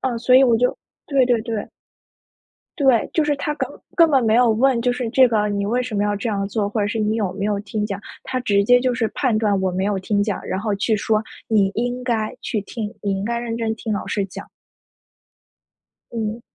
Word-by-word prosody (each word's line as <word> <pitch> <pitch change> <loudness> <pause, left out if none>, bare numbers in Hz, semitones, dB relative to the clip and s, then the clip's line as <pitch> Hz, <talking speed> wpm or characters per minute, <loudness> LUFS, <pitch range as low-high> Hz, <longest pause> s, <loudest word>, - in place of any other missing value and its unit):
啊， 245 -3 -1
所 245 +2 +3
以 260 - +8
我 240 -3 +4
就 250 +2 +1 0.3
对 275 -3 +3
对 245 -2 +2
对。 225 -2 -4 1.1
对， 265 -5 +3
就 315 - +2
是 295 -1 +1
他 295 +1 -2
根 - - -2 0.3
根 335 -1 +6
本 270 -5 +3
没 220 -1 +3
有 245 -1 +5
问， 240 +2 +2
就 245 +1 +1
是 245 -2 -3
这 260 +2 +6
个 215 -3 +1
你 200 -1 -1
为 245 +4 +1
什 245 -4 -4
么 205 - +1
要 205 0 0
这 205 +3 -3
样 200 -2 -1
做？ 200 +1 -1
或 210 +1 -2
者 205 - +1
是 205 - -3
你 215 0 0
有 200 -5 -1
没 200 +1 -4
有 205 -1 0
听 210 +1 -3
讲？ 200 -2 -4 0.2
他 255 - -3
直 205 -5 +2
接 245 +4 +5
就 255 -1 +1
是 235 -2 0
判 255 -6 +1
断 210 -3 +1
我 190 -1 0
没 190 +1 -1
有 200 -1 0
听 205 +2 0
讲， 205 -2 -2
然 190 - -2
后 210 0 -1
去 215 +2 +1
说： 215 +1 +1 0.3
“你 200 -3 +3
应 245 +2 -2
该 225 -3 -1
去 215 - -2
听， 210 +2 -6
你 195 -1 -1
应 195 - -3
该 235 +2 -1
认 235 -1 -3
真 225 -1 -1
听 220 0 -4
老 205 - -3
师 200 - -1
讲。” 185 - -9 1.7
嗯。 225 0 -3
220 Hz, 255 characters per minute, -21 LUFS, 205-245 Hz, 1.7 s, 以